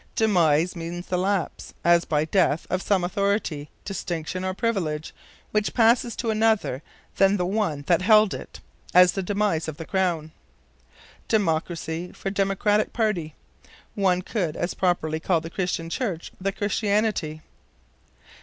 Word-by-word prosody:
Demise 175 -6 +3
means 170 +1 -5
the 180 - -1
lapse, 190 -2 -2
as 170 0 +5
by 150 0 +1
death, 165 -3 +2
of 185 +1 0
some 190 -3 +1
authority, 185 -6 -1 0.2
distinction 185 -2 -4
or 185 - -1
privilege, 185 -8 -2 0.4
which 215 0 0
passes 235 0 +3
to 230 -3 -1
another 220 - +1 0.4
than 195 +1 +4
the 180 - 0
one 185 -7 -1
that 170 +2 +3
held 215 +1 +5
it; - - -9 0.3
as 180 0 +8
the 195 - -3
demise 195 -4 0
of 155 -2 -5
the 165 - -7
Crown. 175 -5 -1 1.0
Democracy 170 -3 -1
for 195 - -4
Democratic 200 +2 +1
Party. 190 -10 -1 0.6
One 185 -3 +1
could 175 -9 -2
as 175 - -2
properly 160 -4 0
call 170 +1 +1
the 165 +1 -8
Christian 180 -3 -2
Church 175 -2 -3
"the 195 +1 0
Christianity." 205 -6 -1
185 Hz, 140 wpm, -25 LUFS, 165-205 Hz, 1.0 s, as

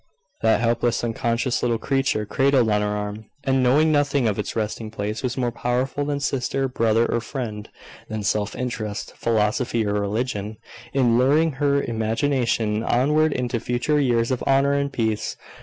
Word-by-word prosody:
That 110 0 +3
helpless, 120 0 +1
unconscious 120 +2 -1
little 120 -2 +1
creature, 135 -3 0
cradled 135 -1 +2
on 105 0 +2
her 105 - 0
arm, 105 +1 -4 0.2
and 135 -1 +2
knowing 145 +6 +4
nothing 145 -4 +2
of 105 - -1
its - - -3
resting 110 0 -3
place, 105 0 -4
was 125 0 -3
more 125 -2 0
powerful 125 +4 -1
than 145 -1 -1
sister, 135 -1 -1
brother, 115 -2 +2
or 120 - -1
friend 115 -5 -5 0.4
than 110 -1 -4
self 105 0 -1
interest, 110 -4 -4
philosophy, 115 +1 0
or 100 - 0
religion, 105 +1 -2 0.3
in 120 -4 +3
luring 150 +5 +3
her 140 0 +1
imagination 115 -1 0
onward 150 +7 +2
into 125 -3 -1
future 125 +6 0
years 120 -3 +1
of 130 - -1
honour 135 +1 +3
and 140 0 0
peace. 110 -4 -2
120 Hz, 160 wpm, -23 LUFS, 110-135 Hz, 0.4 s, knowing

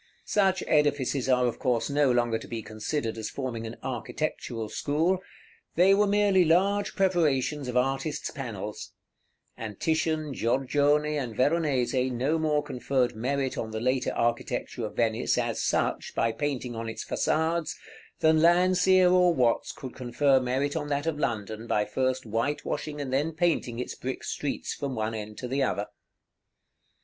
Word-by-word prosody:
Such 190 -2 +2
edifices 145 -3 +1
are 125 -1 +4
of 120 - -2
course 125 -4 +1
no 145 -2 +3
longer 120 -2 +1
to - - -10
be 115 -2 -5
considered 110 +2 -3
as 110 - -3
forming 120 -4 -4
an 115 - -7
architectural 120 -2 -3
school; 160 - 0 0.6
they 185 +3 +6
were 205 +1 +4
merely 200 -2 +4
large 195 +5 +2
preparations 150 -7 +1
of 125 0 -1
artists' 135 +3 -1
panels; 105 -6 -6 0.6
and 105 -3 -7
Titian, 160 -2 0
Giorgione, 145 +5 +1
and 120 -5 -4
Veronese 130 -3 +1
no 135 +7 0
more 150 -2 +1
conferred 130 -3 -1
merit 135 +3 -1
on 110 - -3
the 110 0 -4
later 130 +2 0
architecture 120 0 -1
of - - -12
Venice, 115 -2 +1
as - - -1
such, - - -1
by 115 - +2
painting 130 -2 -3
on 115 0 -4
its 115 - -6
façades, 160 +1 0 0.5
than 160 0 +4
Landseer 180 +2 +5
or 180 -1 +4
Watts 120 -4 +2
could 130 -2 -9
confer 130 +2 +2
merit 130 +4 -1
on 150 -2 -2
that 145 0 -1
of 160 -2 -1
London 110 -3 -3
by 105 -2 +1
first 130 +4 -1
whitewashing 145 +6 -2
and 135 -2 -4
then 150 +5 +1
painting 160 -8 0
its 125 - -4
brick 130 +1 -5
streets 145 - -3
from 140 -2 -4
one 110 0 -2
end 105 -1 -6
to 125 - -5
the 135 +3 -1
other. 105 -6 0
135 Hz, 160 wpm, -27 LUFS, 120-155 Hz, 0.6 s, they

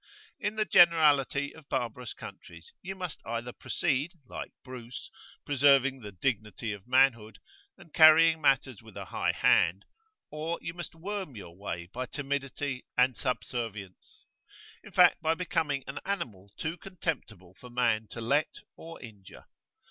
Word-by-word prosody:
In 210 +1 -2
the 215 0 +1
generality 150 -6 +5
of 160 -3 -16
barbarous 125 -1 -3
countries 85 -1 -11
you 190 +1 -6
must 180 -4 -6
either 115 +1 -4
proceed, 150 +2 -1
like - - -7
Bruce, 125 -2 -9 0.3
preserving 140 -1 +4
the 105 -4 -9
"dignity 105 +1 -2
of 100 +2 -11
manhood," 125 -4 +3 0.4
and 165 - -17
carrying 160 0 +7
matters 135 -5 +2
with 110 -3 -13
a - - -6
high - - 0
hand, 90 +5 +3 0.5
or 155 +3 -3
you 165 - -6
must 175 -2 -7
worm 190 -4 -5
your 90 -5 -10
way 85 -3 -5
by 125 +8 -5
timidity 140 -1 -3
and 125 +1 +4
[p.23]subservience; 115 -6 -5 0.6
in - - -13
fact, - - +5
by 160 +1 +2
becoming 165 -6 -1
an 140 - -6
animal 105 - -4
too 160 +2 -3
contemptible 125 - -5
for 125 - -12
man 115 -3 +1
to 115 - -8
let 140 +7 +1 0.2
or 165 0 -10
injure. 105 -5 -13
130 Hz, 145 wpm, -29 LUFS, 110-160 Hz, 0.6 s, carrying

